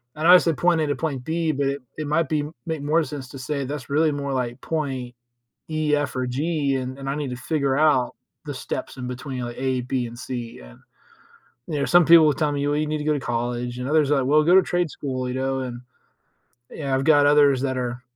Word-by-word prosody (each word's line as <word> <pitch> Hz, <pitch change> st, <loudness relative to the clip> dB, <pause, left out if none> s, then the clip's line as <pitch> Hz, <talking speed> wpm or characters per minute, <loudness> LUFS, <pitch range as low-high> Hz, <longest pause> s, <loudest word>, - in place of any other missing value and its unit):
I 155 Hz, -, -5 dB
know 165 Hz, -, +4 dB
I 185 Hz, -, +11 dB
said 165 Hz, -3 st, 0 dB
point 175 Hz, -2 st, +2 dB
A 155 Hz, -, 0 dB
to 145 Hz, -, 0 dB
point 140 Hz, -6 st, -3 dB
B, 160 Hz, +2 st, 0 dB
but 140 Hz, 0 st, -1 dB, 0.2 s
it 155 Hz, -1 st, -4 dB
might 160 Hz, +2 st, +1 dB
be 150 Hz, -2 st, 0 dB, 0.2 s
make 160 Hz, -3 st, -3 dB
more 155 Hz, +3 st, +2 dB
sense 140 Hz, -4 st, -7 dB
to 135 Hz, -, -9 dB
say 140 Hz, +1 st, -3 dB
that's 140 Hz, -1 st, -6 dB
really 155 Hz, +2 st, +2 dB
more 140 Hz, -1 st, -3 dB
like, 125 Hz, -1 st, -2 dB
point 135 Hz, -6 st, -3 dB, 0.5 s
E, 155 Hz, -1 st, +1 dB
F 145 Hz, -2 st, -2 dB
or 130 Hz, 0 st, -1 dB
G 140 Hz, +2 st, -1 dB
and 130 Hz, +1 st, -5 dB
and 135 Hz, 0 st, -5 dB
I 140 Hz, -, -1 dB
need 145 Hz, -2 st, -3 dB
to -, -, -3 dB
figure 140 Hz, 0 st, 0 dB
out 150 Hz, -5 st, +3 dB, 0.3 s
the -, -, -4 dB
steps -, -, -5 dB
in 125 Hz, -1 st, -5 dB
between, 125 Hz, 0 st, -5 dB
like, 120 Hz, 0 st, -6 dB
A, 130 Hz, -1 st, 0 dB
B 125 Hz, 0 st, -2 dB
and 115 Hz, +1 st, -10 dB
C, 120 Hz, -2 st, -6 dB
yeah. -, -, -13 dB, 0.9 s
You 150 Hz, -3 st, -2 dB
know, -, -, +1 dB
some 175 Hz, 0 st, +5 dB
people 165 Hz, 0 st, +7 dB
will 150 Hz, -, +4 dB
tell 150 Hz, +1 st, 0 dB
me, 145 Hz, 0 st, -1 dB
"Well, 145 Hz, -, +1 dB
you 155 Hz, +1 st, 0 dB
need 155 Hz, 0 st, -1 dB
to 150 Hz, -, -5 dB
go 155 Hz, -, +2 dB
to 145 Hz, -, -1 dB
college," 120 Hz, 0 st, -3 dB
and 125 Hz, -, -4 dB
others 150 Hz, -2 st, +3 dB
are 145 Hz, -, +4 dB
like, 130 Hz, -, 0 dB
"Well, 150 Hz, +3 st, +4 dB
go 170 Hz, +3 st, +4 dB
to 190 Hz, -, +8 dB
trade 175 Hz, -2 st, -1 dB
school," 130 Hz, -3 st, -4 dB
you 125 Hz, -, -3 dB
know, 135 Hz, 0 st, -1 dB
and 120 Hz, -2 st, -5 dB, 0.9 s
yeah, 140 Hz, -3 st, -3 dB
I've 135 Hz, -, 0 dB
got 145 Hz, -2 st, +5 dB
others 145 Hz, -2 st, +5 dB
that 130 Hz, -1 st, -1 dB
are 125 Hz, 0 st, -3 dB
140 Hz, 250 wpm, -23 LUFS, 130-155 Hz, 0.9 s, I